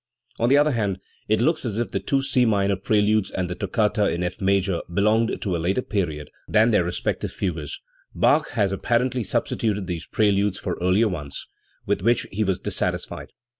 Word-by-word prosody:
On 115 - +2
the 140 - +6
other 150 +1 +4
hand, 100 -6 -1 0.3
it 110 0 +2
looks 155 +5 +1
as 110 -5 -3
if 120 - -2
the - - -1
two 135 -1 0
C 130 -2 +2
minor 100 -3 +2
preludes 105 +1 +2
and 90 -1 -2
the 90 - -3
toccata 105 +2 +1
in 85 +1 -2
F 90 - -4
major 95 -2 +1
belonged 110 +5 +2
to 95 -4 -1
a - - -1
later 95 +9 0
period 80 -8 -3 0.2
than 110 +2 +4
their 105 -5 +3
respective 85 +1 -2
fugues; 80 -6 -4 0.4
Bach - - +3
has 100 -1 +1
apparently 120 +5 0
substituted 105 0 -1
these 85 -2 -5
preludes 100 -3 +2
for - - -3
earlier 95 +5 +3
ones 75 -8 -5 0.4
with - - 0
which 120 +4 +2
he 110 +2 0
was 95 -3 0
dissatis - - -2
fied. - - -8
100 Hz, 190 wpm, -24 LUFS, 95-115 Hz, 0.4 s, the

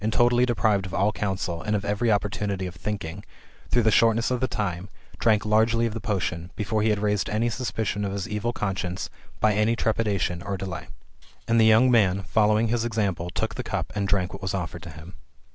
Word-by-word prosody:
185 110 +1 -1
totally 120 +1 +3
deprived 105 -5 +1
of 95 - -6
all 100 +2 +2
counsel, 95 -5 -2
and 105 - -1
of 100 -1 -2
every 105 +3 +1
opportunity 100 -2 -1
of 90 - -5
thinking, 90 -3 -5 0.5
through 120 - +3
the 110 - +4
shortness 115 +2 +3
of 125 - 0
the 130 - +1
time, 95 -5 -3 0.3
drank 110 -2 +3
largely 110 +2 +3
of 115 - -2
the 115 - -5
potion, 90 -6 -2
before 105 0 -1
he 110 - +2
had 105 - +2
raised 105 -1 0
any 115 +3 0
suspicion 110 -4 -2
of 100 - -2
his 100 -1 -3
evil 105 +3 -2
conscience 95 -4 -3 0.3
by 110 - +3
any 105 +3 +2
trepidation 105 -6 0
or 100 +2 -3
delay. 95 0 -5 0.6
And 115 0 +4
the 110 - +6
young 115 +4 +6
man, 100 -5 +3
following 110 +3 +2
his 120 0 +1
example, 100 -7 -1
took - - -2
the - - -4
cup - - -3
and 100 -1 0
drank 95 -2 0
what 95 - -8
was 95 0 -2
offered 85 -2 -4
to 85 - -9
him. 80 +3 -11
105 Hz, 210 wpm, -25 LUFS, 95-110 Hz, 0.6 s, the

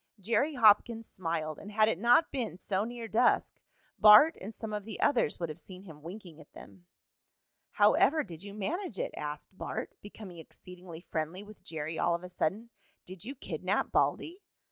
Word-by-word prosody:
Jerry 235 +9 0
Hopkins 225 0 +4
smiled, 165 -6 -4
and 205 - -10
had 215 +1 +3
it 215 - 0
not 240 +8 +4
been 240 -9 -3
so 195 +1 -1
near 235 -1 -6
dusk 235 +3 +2 0.5
Bart 215 +10 +8
and 200 - -6
some 220 -2 -6
of 210 -1 -3
the 220 - -8
others 215 - +1
would 170 -2 -3
have 155 +2 -8
seen 185 +1 -12
him 160 -6 -13
winking 170 -1 -10
at 145 - -18
them. 95 -3 -14 0.9
"How 210 +1 +5
ever 310 +2 +3
did 170 -5 -11
you 200 0 -9
manage 310 - -3
it?" - - -3
asked 150 +5 -6
Bart, - - -5
becoming 200 -4 -11
exceedingly 175 +1 -12
friendly 165 +3 -4
with 215 0 -14
Jerry 160 0 -5
all 170 0 +2
of 170 - -7
a 180 - -8
sudden. 195 +7 -2 0.3
"Did 185 +1 -9
you 270 +4 -6
kidnap - - -2
Baldy?" 355 +5 0
200 Hz, 185 wpm, -30 LUFS, 170-225 Hz, 0.9 s, Bart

